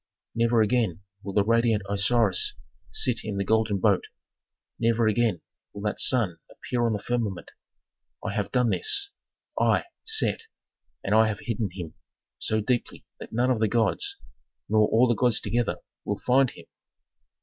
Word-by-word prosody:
Never 115 -1 +3
again 105 -6 0 0.2
will 100 - -6
the 100 - +3
radiant 115 -2 +2
Osiris 100 0 +1 0.4
sit 125 -2 +1
in 105 -2 -4
the 100 - 0
golden 110 0 +1
boat, 100 0 +2 0.7
never 115 0 +2
again 110 -5 +1 0.3
will 100 - -8
that 105 - -2
sun 105 -10 +2
appear 120 -1 -2
on 115 - 0
the 105 - -2
firmament. 115 -6 -3 0.7
I 100 - -2
have 105 -1 -2
done 125 -3 +2
this, 405 -2 +1 0.5
I, - - +3 0.2
Set, 445 0 0 0.6
and 100 - -1
I 110 0 +5
have 105 -1 -3
hidden 115 -3 -2
him 85 -4 -7 0.5
so 110 0 0
deeply 120 +3 -2
that - - -9
none 125 +3 +1
of 120 - +1
the 110 - +2
gods, 120 - +1 0.5
nor 110 0 +3
all 120 +3 +4
the 120 - +3
gods 120 0 +2
together 120 -1 -1 0.3
will 100 - -2
find 130 +3 +3
him." - - -14
110 Hz, 160 wpm, -26 LUFS, 105-120 Hz, 0.7 s, I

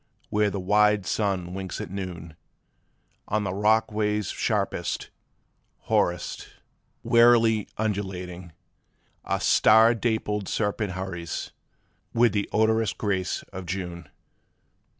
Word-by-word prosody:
when 105 -1 +2
the 100 - -3
wide 105 +1 +3
sun 95 -5 -1
winks 95 -3 -5
at - - -6
noon, 90 -4 -6 0.9
On 105 0 0
the 95 -2 -2
rock 110 +3 +2
ways 105 -1 -1
sharpest, - - -2 0.7
hoarest, 85 -2 -1 0.6
warily 115 -2 +4
undulating, 95 -4 -4 0.7
A - - -1
star 110 +2 +5
dappled 110 -3 -1
serpent 105 -2 -1
hurries, 90 -3 -5 0.6
with 115 -2 +4
the 100 -1 -1
odorous 110 0 +2
grace 95 -4 -2
of 95 -1 -7
June. 90 -3 -5
100 Hz, 105 wpm, -26 LUFS, 90-110 Hz, 0.9 s, star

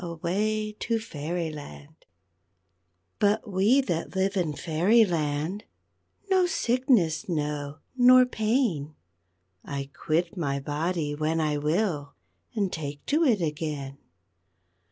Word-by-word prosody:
AWAY! 210 +6 -2
TO 230 -1 0
FAIRYLAND 155 -5 -6 1.1
_But 205 +3 +2
we 205 +8 +3
that 175 -8 -3
live 190 +1 +1
in 170 -5 0
Fairyland 170 0 +1 0.6
No 375 -2 +3
sickness 245 - +1
know, 150 -2 -2 0.2
nor 255 0 +7
pain; 215 - 0 0.7
I 140 -1 -5
quit 170 +4 -1
my 140 -6 -1
body 150 +2 -2
when 155 +2 0
I 150 -2 0
will, 150 -2 -1 0.4
And 200 -4 0
take 145 -3 -5
to 305 +3 +2
it 230 - +3
again. 150 -3 -4
170 Hz, 105 wpm, -27 LUFS, 150-215 Hz, 1.1 s, nor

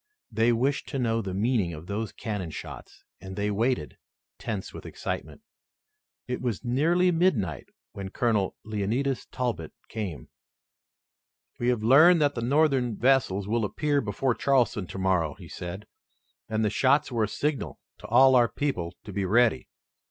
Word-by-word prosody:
They 115 +2 +3
wished 130 +5 0
to 140 - -3
know 115 -3 +1
the 95 -3 -5
meaning 105 -4 +1
of 75 +2 -10
those 105 +2 -3
cannon 105 -6 -4
shots - - -9 0.2
and 95 0 -8
they 105 +1 -1
waited, 115 +5 -1 0.4
tense - - -4
with - - -9
excitement. - - -5 0.9
It 125 - -3
was 125 -1 -3
nearly 170 +9 +3
midnight 130 - 0 0.2
when 100 -1 -6
Colonel 105 -3 0
Leonidas 110 +6 -1
Talbot 115 - -3 0.2
came. 100 -8 -5 1.3
"We 120 - -1
have 120 -3 +1
learned 160 +9 +7
that 145 -1 +2
the 115 - -4
Northern 130 -3 +2
vessels 115 -6 +2
will 115 +1 0
appear 145 +7 0
before 115 +4 0
Charleston 120 -8 +1
tomorrow," 95 -5 0
he - - -12
said, 90 +4 -7 0.6
"and 110 0 0
the 105 - +1
shots 140 +5 +2
were 115 -3 +1
a - - -5
signal 145 +6 -3 0.2
to - - -10
all 130 +3 +6
our 120 -2 +5
people 100 -10 -3
to 105 - -9
be 100 0 -1
ready. 115 +4 +3
115 Hz, 155 wpm, -27 LUFS, 100-135 Hz, 1.3 s, learned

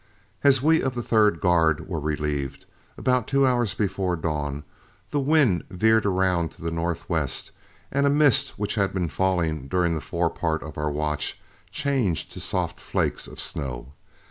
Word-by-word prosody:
As 135 -2 +5
we 160 +1 +4
of 130 -2 -2
the 120 - -3
third 105 -7 +3
guard 80 -2 +2
were 85 -4 -3
relieved, 75 -2 -3 0.3
about 125 -3 +1
two 140 0 +3
hours 120 -4 +1
before 95 -3 0
dawn, 75 -3 -3 0.5
the 145 - +1
wind 140 - +3
veered 110 +3 +3
around 90 -3 +1
to - - -14
the 85 - -2
northwest, 85 +1 -2 0.4
and 140 +1 +2
a - - +4
mist 140 -2 +3
which 105 0 -2
had 100 -3 0
been 90 -3 0
falling 80 -4 0
during 85 +3 +1
the 80 - -2
fore 85 -1 -1
part 80 -1 -2
of 75 -3 -8
our 75 0 -1
watch 75 0 -2 0.3
changed 135 - -1
to - - -7
soft - - -2
flakes - - -1
of - - -11
snow. 65 0 -5
90 Hz, 170 wpm, -25 LUFS, 80-120 Hz, 0.5 s, As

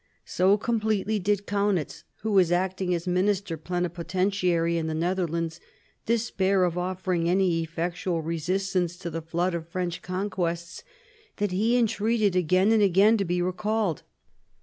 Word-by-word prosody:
So 190 +3 +3
completely 215 -1 0
did 205 +1 0
Kaunitz, 200 -5 -1 0.2
who 220 - -1
was 185 -4 +4
acting 185 +1 0
as 170 - -4
minister 185 0 0
plenipotentiary 175 +1 -1
in 165 -1 -1
the 160 - -2
Netherlands, 170 -1 -1 0.5
despair 200 -5 +1
of 175 -2 0
offering 180 -1 -1
any 180 -2 +2
effectual 170 +1 -3
resistance 175 +2 -1
to 170 -1 -6
the 165 +1 -4
flood 170 +3 -1
of 165 -1 -5
French 175 -1 -3
conquests, 180 -3 -3 0.5
that 205 -2 -1
he 220 +6 +2
entreated 220 -3 +1
again 185 +4 +3
and 225 -1 +4
again 200 +3 +5
to 200 - -1
be 175 0 0
recalled. 205 -1 -1
185 Hz, 140 wpm, -26 LUFS, 170-200 Hz, 0.5 s, again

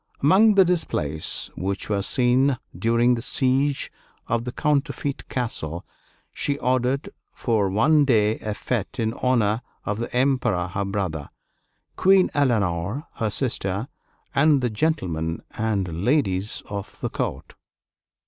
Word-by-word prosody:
Among 200 +8 +6
the 190 -2 +7
displays 80 - -1
which 95 +1 -3
were 100 -2 0
seen 125 +4 +2 0.2
during 115 +2 +3
the 120 - -2
siege 135 +3 0 0.3
of 120 +1 -1
a - - -2
counterfeit 145 0 -1
castle, 85 -10 -3 0.5
she 140 -1 -1
ordered 130 +1 0 0.3
for 110 -5 +1
one 145 +9 +4
day 110 -4 +2
a 105 -1 -4
fête 110 -1 -3
in 110 -1 0
honor 115 -3 +2 0.2
of 105 +1 -2
the 120 - -4
Emperor 125 -8 +1
her 100 +2 -2
brother, 95 -7 -3 0.7
Queen 190 0 +5
Eleanor 110 - 0
her 110 - 0
sister, 105 -2 -1 0.4
and 145 0 +4
the 125 -2 0
gentlemen 90 - -1
and 100 -6 -2
ladies 105 -7 +1
of 100 -1 -7
the - - -1
court. - - -4
120 Hz, 130 wpm, -24 LUFS, 100-140 Hz, 0.7 s, the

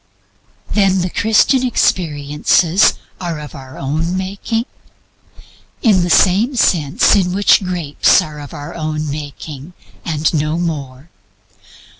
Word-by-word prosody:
Then 195 -3 +2
the 180 0 -3
Christian 225 +4 +2
experiences 160 - +2 0.3
are 170 -4 -4
our 130 -1 -11
own 160 +6 -2
making? 200 +5 -3 1.2
In 205 -6 +4
the 175 - -1
same 205 - +3
sense 165 - +2
in 180 -3 +1
which 200 +1 +4
grapes 175 -6 +2
are 150 -1 -5
our 145 +4 -8
own 155 -2 -3
making 145 +1 -8 0.3
and 155 -1 -1
no 155 +1 -1
more. 150 -3 -5
170 Hz, 110 wpm, -16 LUFS, 150-190 Hz, 1.2 s, In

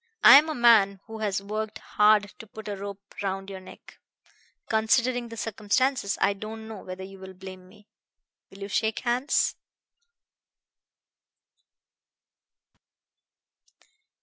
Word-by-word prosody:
"I 275 - +11
am 310 +2 -3
a 310 - -3
man 220 -5 +5
who 220 -1 -9
has 200 -2 -2
worked 215 +1 -4
hard 210 -1 +2
to 225 - -11
put 215 +1 -11
a 205 - -3
rope 200 0 -9
round 195 0 -4
your 190 - -7
neck. 185 - -15 0.7
Considering 240 +2 +1
the 230 - -9
circumstances 225 +1 0
I 200 - +2
don't 220 +2 -8
know 220 -3 -9
whether 185 0 -8
you 195 0 -11
will 190 0 -11
blame 185 0 -11
me. 210 +1 -20 0.6
Will 195 +1 -15
you - - -5
shake 220 +2 -1
hands?" 250 +3 +1
210 Hz, 125 wpm, -26 LUFS, 195-225 Hz, 0.7 s, I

